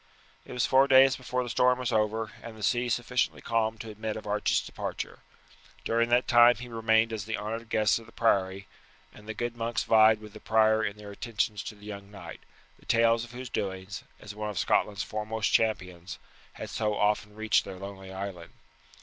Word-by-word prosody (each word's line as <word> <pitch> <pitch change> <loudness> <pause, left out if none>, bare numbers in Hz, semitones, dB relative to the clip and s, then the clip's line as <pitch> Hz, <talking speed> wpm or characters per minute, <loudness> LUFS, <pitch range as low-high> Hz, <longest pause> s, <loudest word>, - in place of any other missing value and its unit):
It - - -12
was 125 0 +1
four 135 +1 +5
days 135 0 +6
before 125 0 -2
the 120 - -6
storm 125 +1 +3
was 125 -1 -2
over 110 +1 0
and 115 -1 -9
the 105 - -9
sea 120 +4 +1
sufficiently 120 +1 0
calmed 110 -1 -1
to 110 - -8
admit 110 +1 -4
of 110 - -7
Archie's 105 0 +1
departure. - - -5 0.7
During 115 +1 +1
that 120 +1 +3
time 120 0 +7
he 125 - -9
remained 115 -1 +2
as 105 -3 -4
the 110 0 -3
honoured 110 +2 -5
guest 110 0 +2
of 115 - -15
the - - -15
priory, 95 -3 +1 0.5
and 105 - -15
the 110 - -5
good 120 +1 -3
monks 115 0 -2
vied 110 0 +5
with 105 -1 -12
the 110 - -10
prior 110 0 +3
in 100 -1 -3
their 105 -1 -10
attentions 105 -1 -2
to 105 - -6
the 105 0 -16
young 100 -1 -8
knight, 95 -5 -10 0.4
the - - -22
tales 115 0 +3
of 120 0 -11
whose 125 0 -7
doings, 95 0 -4 0.2
as 105 - -9
one 105 0 -4
of 105 - -6
Scotland's 100 +1 +1
foremost 110 +2 -2
champions, 90 -5 0 0.4
had - - -8
so 105 -2 -1
often 105 0 0
reached 110 -1 +2
their 95 - -8
lonely 95 0 -9
island. 95 -3 -7
110 Hz, 200 wpm, -28 LUFS, 105-115 Hz, 0.7 s, time